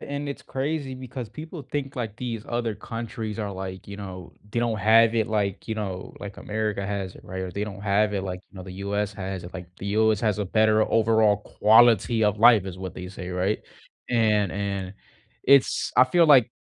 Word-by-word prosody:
and 145 0 -5
it's 140 - -6
crazy 140 0 -3
because 130 -2 -7
people 155 - -8
think, 135 0 -4
like, 110 -4 -4
these 115 -3 -4
other 120 -2 -1
countries 110 0 -6
are, 105 -2 -3
like, 95 0 -7
you 100 - -8
know 95 -3 -8 0.2
they 120 - -2
don't 115 -2 0
have 115 +2 +5
it 110 -2 +2
like, 105 -3 -1
you 110 - -2
know, 95 -4 -5
like 100 -1 -7
America 105 -2 -2
has 100 -3 -3
it, - - -16
right? 95 0 -6
Or 95 - -4
they 100 +4 -3
don't 100 -2 -8
have 105 +1 +2
it 95 - -1
like, 90 -1 -5
you - - -17
know, 95 - -7
the 90 0 -9
U.S. 100 0 -1
has 95 -2 -5
it. 90 - -10
Like, 90 -2 -7
"The 100 - -5
U.S. 110 -2 +3
has 105 -3 +1
a 105 - 0
better 110 +2 +3
overall 110 -2 +3
quality 110 +1 +4
of 105 0 +1
life," 115 -3 +7
is 95 -2 -7
what 95 -2 -6
they 90 0 -7
say, 90 -1 -7
right? 90 +3 0 0.5
And 105 -5 +2
and 100 -1 -3 0.5
it's 140 0 +4
I 130 - +8
feel 170 +6 +4
like 130 -6 +6
105 Hz, 215 wpm, -25 LUFS, 95-115 Hz, 0.5 s, I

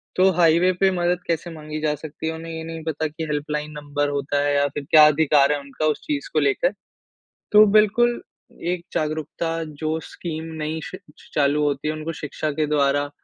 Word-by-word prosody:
तो 185 +1 +5
हाईवे 170 +2 +5
पे 195 -1 +5
मदद 175 -1 0
कैसे 170 +1 -1
माँगी 155 -1 -6
जा 150 -1 +1
सकती 155 +1 -7
है 160 - -1
उन्हें 165 +1 -7
ये 160 0 -5
नहीं 165 0 -7
पता 160 0 -2
की 160 +2 -7
हेल्पलाइन 150 +1 -3
नंबर 145 0 -2
होता 145 0 -1
है 145 0 +1
या 140 0 +3
फिर 145 +1 -6
क्या 155 -1 +9
अधिकार 150 -2 +4
है 145 - -2
उनका 140 +2 -4
उस 150 -1 0
चीज़ 295 -2 -2
को - - +3
लेकर। - - +1 0.8
तो 210 0 +8
बिल्कुल 235 +3 +3 0.5
एक 175 -1 -4
जागरूकता 155 +1 -2 0.3
जो 160 +1 -1
स्कीम 160 -2 -6 0.2
नई 155 +1 -2
श - - -7 0.4
चालू 145 0 +2
होती 145 0 -1
है 155 - 0
उनको 155 +1 -5
शिक्षा 155 0 -4
के 155 - +3
द्वारा 145 -1 +1
155 Hz, 195 wpm, -23 LUFS, 145-165 Hz, 0.8 s, क्या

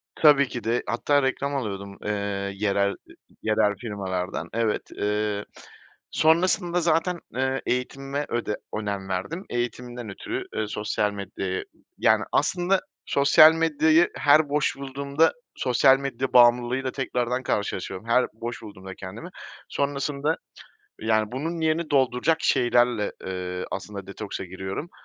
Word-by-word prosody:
Tabii 145 -3 +6
ki 120 -1 -6
de, 115 +2 0
hatta 145 +4 +2
reklam 140 +2 -1
alıyordum, 100 -6 -4
ııı, 100 -1 -2
yerel 100 0 +1 0.5
yerel 110 -1 +2
firmalardan, 95 -4 -4
evet. 115 -1 -1
Iıı, 105 0 -1 0.7
sonrasında 175 +2 +3
zaten, 170 +2 +1 0.2
eee, 130 +1 0
eğitimime 135 +3 -2
öde 115 -3 -2 0.2
önem 100 -2 -4
verdim. 150 - -3
Eğitimimden 120 -1 -4
ötürü, 100 - -5
eee, 110 - -1
sosyal 105 0 -1
medyaya 95 -2 -4 0.3
Yani, - - +4
aslında 185 +1 +2 0.2
sosyal 155 +3 +7
medyayı 160 +1 +3
her 150 +1 +4
boş 145 -1 +1
bulduğumda, 140 +3 +1 0.2
sosyal 130 +1 +4
medya 135 -1 -3
bağımlılığıyla 125 +2 +4
tekrardan 125 -1 -1
karşılaşıyorum. 100 -1 -3
Her 125 +2 +4
boş 115 +2 -6
bulduğumda 95 -3 -10
kendimi 100 - -8 0.4
sonrasında, 140 +2 -1 0.6
yani, 110 0 +1
bunun 160 +6 -3
yerini 160 +1 +1
dolduracak 135 +3 +3
şeylerle, 120 -3 +2
eee, 90 -1 -4
aslında 100 0 -6
detoksa 100 0 -6
giriyorum. 95 - -5
120 Hz, 120 wpm, -25 LUFS, 105-140 Hz, 0.7 s, sosyal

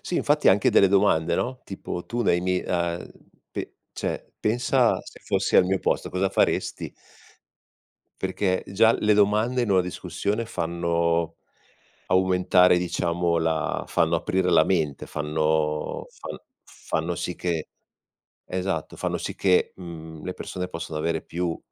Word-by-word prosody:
Sì, 180 - -5
infatti 150 +1 +2
anche 95 +1 +4
delle 100 - +5
domande 95 -5 +3
no, 125 +5 -2
tipo: 90 -2 -6
"Tu 120 0 -2
nei 90 -5 +2
mi 90 0 0
uhm, 85 -1 -2 0.4
p - - -5 0.2
cioè, - - -4
pensa, 115 +3 +2
se - - -13
fossi - - +1
al - - +7
mio 95 +1 +1
posto, - - -1
cosa 95 +1 0
faresti?" - - 0 1.3
Perché 95 0 0
già 110 +4 +4
le 105 0 +2
domande 105 +5 +2
in 110 - -1
una 95 - +5
discussione 100 +4 -3
fanno 85 -4 -1 0.7
aumentare, 90 -1 +4
diciamo, 85 -1 0
la 80 -2 -1
fanno 85 +1 +2
aprire 90 +2 0
la 80 -1 +5
mente, 80 -7 0
fanno 75 0 -1
fan - - -8 0.2
fanno 85 +2 -4
sì 90 - -3
che 85 -3 -2 0.7
esatto, 95 +1 -3
fanno - - -1
sì - - -5
che, 95 -2 +2
mhmm, 80 -3 -9
le 90 - -3
persone 90 0 -5
possano 85 -3 -5
avere 80 0 -1
più 85 -1 -3
90 Hz, 140 wpm, -25 LUFS, 85-95 Hz, 1.3 s, al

